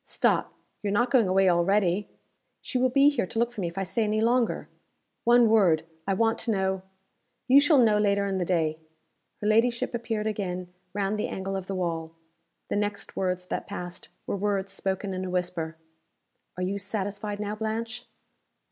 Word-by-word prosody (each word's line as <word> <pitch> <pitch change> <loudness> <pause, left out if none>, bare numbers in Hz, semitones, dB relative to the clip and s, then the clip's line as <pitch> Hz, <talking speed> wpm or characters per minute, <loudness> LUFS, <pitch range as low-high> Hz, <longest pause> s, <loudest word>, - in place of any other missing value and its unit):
Stop! - - 0 0.3
you're 205 - -1
not 240 +4 +2
going 240 -7 +4
away 190 +1 +3
already?" 185 +2 +2 0.5
"She 255 - -2
will 255 +1 +3
be 275 +3 +5
here 250 -10 -1
to - - -7
look 235 +1 +2
for 230 -4 -6
me 175 - -1
if 170 - -8
I 195 - 0
stay 225 +5 0
any 215 0 +1
longer." 235 +1 +1 0.6
"One 240 0 +6
word! 190 -8 +4 0.2
I 195 - +2
want 225 +2 +2
to 230 - 0
know 190 -2 0 0.3
" 245 0 -49
"You 265 +2 +8
shall 295 +1 +5
know 220 -4 +5
later 200 -1 +2
in 195 -1 -1
the - - +1
day." 160 -3 0 0.6
Her 210 - -1
ladyship 235 +3 +2
appeared 225 -2 -2
again 185 -4 -3 0.2
round 205 +1 0
the - - 0
angle 195 +1 -4
of 190 -1 -4
the 195 - -3
wall. 165 -3 -3 0.5
The - - 0
next 205 0 -3
words 180 -1 -1
that - - -4
passed 180 -3 -7 0.2
were - - -2
words 200 -1 -1
spoken 195 0 -2
in 185 0 -3
a 185 - -4
whisper. 175 -3 -2 0.8
"Are 180 - -2
you 195 +2 -1
satisfied 205 +1 -4
now, 210 0 -2
Blanche?" 230 +3 -4
200 Hz, 190 wpm, -27 LUFS, 185-225 Hz, 0.8 s, You